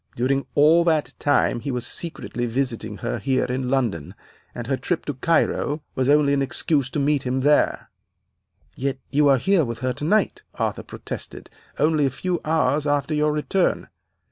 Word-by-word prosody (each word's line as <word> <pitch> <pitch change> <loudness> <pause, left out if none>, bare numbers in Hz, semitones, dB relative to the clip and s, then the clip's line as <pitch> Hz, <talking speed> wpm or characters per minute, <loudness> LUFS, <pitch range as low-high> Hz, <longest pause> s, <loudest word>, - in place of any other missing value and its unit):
During 135 +3 0
all 155 +4 +5
that 160 -3 +1
time 145 -4 +2
he 140 - -5
was 125 -2 -3
secretly 120 -7 -4
visiting 125 0 -2
her - - -2
here 135 -1 +1
in 125 0 -2
London, 115 - -1 0.4
and - - -5
her - - 0
trip - - -3
to - - -2
Cairo 150 +1 0
was 130 +1 0
only 145 -1 +4
an 140 - +1
excuse 135 0 0
to 145 - -3
meet 145 0 +2
him 130 0 -1
there.' 145 +2 +2 0.8
"'Yet 135 0 -2
you 145 +1 +3
are 135 -1 +5
here 190 +6 +2
with 115 -3 -4
her 130 - 0
tonight,' 180 - 0
Arthur - - -2
protested, - - -8 0.3
'only 150 -1 +2
a - - 0
few 175 +6 -3
hours 150 -2 +1
after 145 +1 0
your 150 0 +2
return. 150 +5 0
140 Hz, 170 wpm, -23 LUFS, 130-150 Hz, 0.8 s, all